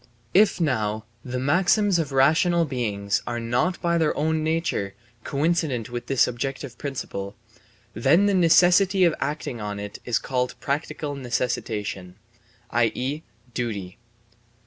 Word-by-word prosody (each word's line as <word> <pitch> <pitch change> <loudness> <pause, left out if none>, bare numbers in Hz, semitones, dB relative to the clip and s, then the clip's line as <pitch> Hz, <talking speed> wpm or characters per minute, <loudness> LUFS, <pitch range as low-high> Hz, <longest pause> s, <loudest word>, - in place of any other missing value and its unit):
If 205 +1 +4
now 110 -8 0 0.2
the 125 0 -4
maxims 175 - +3
of 150 -4 -2
rational 160 +5 +3
beings 105 -7 -1
are 120 0 -2
not 120 +11 0
by 170 -1 +2
their 160 -2 +1
own 155 +1 +1
nature 160 - -1 0.3
coincident 140 -6 0
with 120 0 -5
this 135 -2 +3
objective 130 +1 -4
principle, 105 -8 -5 0.6
then 140 - +4
the 205 - +3
necessity 180 +2 +5
of 170 -3 +4
acting 145 -6 -3
on 105 -1 -4
it 105 0 -7
is 120 - +1
called 125 -1 -2
practical 150 +1 -3
necessitation, 115 -8 -3 0.6
i.e., 125 +5 0 0.3
duty. 105 -6 -4
135 Hz, 125 wpm, -24 LUFS, 115-165 Hz, 0.6 s, necessity